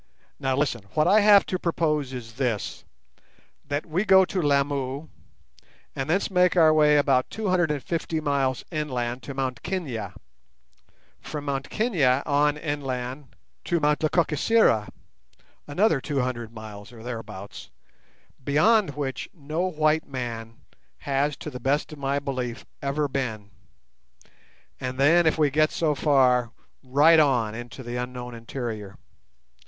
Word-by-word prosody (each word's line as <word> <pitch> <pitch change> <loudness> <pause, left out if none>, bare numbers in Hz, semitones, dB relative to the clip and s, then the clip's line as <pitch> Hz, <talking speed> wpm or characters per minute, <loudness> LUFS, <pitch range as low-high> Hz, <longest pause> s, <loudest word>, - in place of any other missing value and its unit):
Now 135 -1 0
listen. 135 -4 0
What 155 +1 +3
I 205 +4 +6
have 205 -1 +6
to 185 - -3
propose 150 -6 0
is 120 -3 -8
this. 120 -5 -3 0.8
That 145 +1 -3
we 170 +4 -1
go 190 -2 +6
to 185 0 -2
Lamu 140 0 0 0.9
and 135 +2 -3
thence 190 +5 +1
make 180 0 +3
our 160 -2 +6
way 150 -1 +5
about 135 -3 +2
250 170 - -1
miles 140 -4 0
inland 125 -6 -2
to 140 +2 -8
Mt 130 -3 -3
Kenia; 130 - -4 1.0
from 150 -1 -7
Mt 135 -1 -3
Kenia 150 - +2
on 145 0 +2
inland 135 -3 -4 0.3
to 170 - +1
Mt 150 -1 +2
Lekakisera, 155 - +2 0.8
another 155 0 +2
200 125 -6 -2
miles, 110 -2 -10
or 115 -2 -12
thereabouts, 115 -5 -8 0.7
beyond 155 - +3
which 135 -3 -4
no 160 +3 -2
white 155 -1 +1
man 115 -4 -6 0.4
has 140 +1 0
to 150 - -7
the 125 - -7
best 140 +5 0
of 150 - -11
my 140 0 0
belief 130 -4 -4 0.2
ever 140 +2 0
been; 110 -7 -4 1.3
and 125 0 -4
then, 160 +5 +5
if 160 - +2
we 150 -3 +3
get 155 +2 +3
so 155 -3 0
far, 130 -5 +3 0.3
right 145 +5 +5
on 125 -8 +2
into 120 +3 -8
the 120 0 -5
unknown 125 0 -5
interior. 115 -4 -6
140 Hz, 135 wpm, -25 LUFS, 125-155 Hz, 1.3 s, I